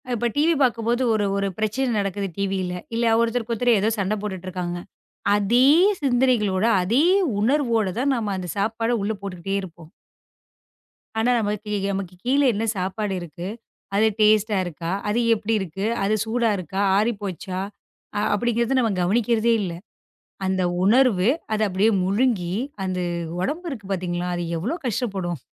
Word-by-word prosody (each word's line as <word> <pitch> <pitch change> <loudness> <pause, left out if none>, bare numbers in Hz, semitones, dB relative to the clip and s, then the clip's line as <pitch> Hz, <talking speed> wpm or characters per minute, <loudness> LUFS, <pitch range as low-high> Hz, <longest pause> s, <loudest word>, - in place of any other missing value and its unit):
இப்ப 240 +1 0
டிவி 315 +3 +3
பாக்கும்போது 235 0 +1
ஒரு 210 -2 +1
ஒரு 200 - 0
பிரச்சனை 220 +5 0
நடக்குது 195 0 -2
டிவில்ல. 190 -2 -1 0.2
இல்ல 230 -1 +2
ஒருத்தருக்கு 235 0 -1
ஒருத்தர் 240 0 +3
ஏதோ 215 - +2
சண்டை 200 +2 0
போட்டுட்டு 190 -3 -5
இருக்காங்க. 175 -1 -4 0.6
அதே 230 +5 +3 0.4
சிந்தனைகளோட 245 -7 +2 0.2
அதே 230 +11 +2 0.4
உணர்வோடு 230 -6 +1
தான் 275 +1 +2
நாம 215 -4 -2
அந்தச் 185 +1 -5
சாப்பாட 225 +3 0
உள்ள 215 +2 0
போட்டுக்கிட்டே 195 0 -4
இருப்போம். 170 -3 -11 1.3
ஆனா 225 +2 +2
நமக்குக் 200 -3 -3
கீழ 270 +3 +3
என்ன 215 +2 -2
சாப்பாடு 195 +2 -2
இருக்கு, 175 +1 -7 0.5
அது 215 +2 +4
டேஸ்டா 215 0 +4
இருக்கா, 170 0 -5 0.2
அது 215 +3 +1 0.2
எப்படி 220 +1 -2
இருக்கு, 190 +2 -4 0.2
அது 205 +2 +2
சூடா 230 0 +1
இருக்கா, 185 +2 -3 0.2
ஆறிப்போச்சா 200 -4 -2 0.6
அ - - +1
அப்டிங்கிறதை 235 +4 +1
நாம 230 -3 +2
கவனிக்கிறதே 230 +4 +2
இல்ல. 185 - -2 0.8
அந்த 190 0 0 0.2
உணர்வு 220 -3 +4 0.2
அத 215 - 0
அப்படியே 195 +4 +2
முழுங்கி 195 -3 +1 0.3
அந்த 185 -1 -2 0.4
உடம்பு 315 - -2
இருக்கு 220 -8 -7
பாத்தீங்களா, 175 -1 -2
அது 175 - -2
எவ்வளவு 240 - -3
கஷ்டப்படும். 195 - -2
210 Hz, 140 wpm, -23 LUFS, 190-235 Hz, 1.3 s, அது